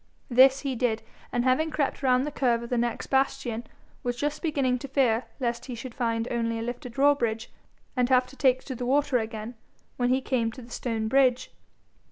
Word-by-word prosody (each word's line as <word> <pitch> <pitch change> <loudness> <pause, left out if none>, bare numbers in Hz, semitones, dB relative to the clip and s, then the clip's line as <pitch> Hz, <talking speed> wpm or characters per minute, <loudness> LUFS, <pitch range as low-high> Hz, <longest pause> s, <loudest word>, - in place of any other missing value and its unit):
This 265 +2 +6
he 275 -2 -2
did, 230 -2 0 0.3
and 240 - 0
having 260 +5 +2
crept 295 -3 -1
round 255 -1 +3
the 295 - -3
curve 240 -4 +1
of 235 - -9
the 245 - +1
next 235 -1 -1
bastion, 265 -4 0 0.4
was 245 0 -2
just 295 +4 -2
beginning 275 -6 +1
to 275 - -6
fear 250 -4 +2
lest 235 -2 -2
he 250 - -6
should 235 +1 -8
find 230 -2 -1
only 230 -1 -1
a 225 - -3
lifted 245 0 -6
drawbridge, 245 -5 +2 0.4
and 250 -1 +2
have 255 -1 +4
to 265 - -15
take 260 -2 +2
to 265 - -5
the 245 0 -4
water 275 -1 +2
again, 220 +1 -5 0.4
when 245 -1 +1
he 260 +1 +3
came 245 -4 0
to 255 - -10
the 235 - -14
stone 225 -3 -2
bridge. 255 0 +3
250 Hz, 205 wpm, -27 LUFS, 235-270 Hz, 0.4 s, This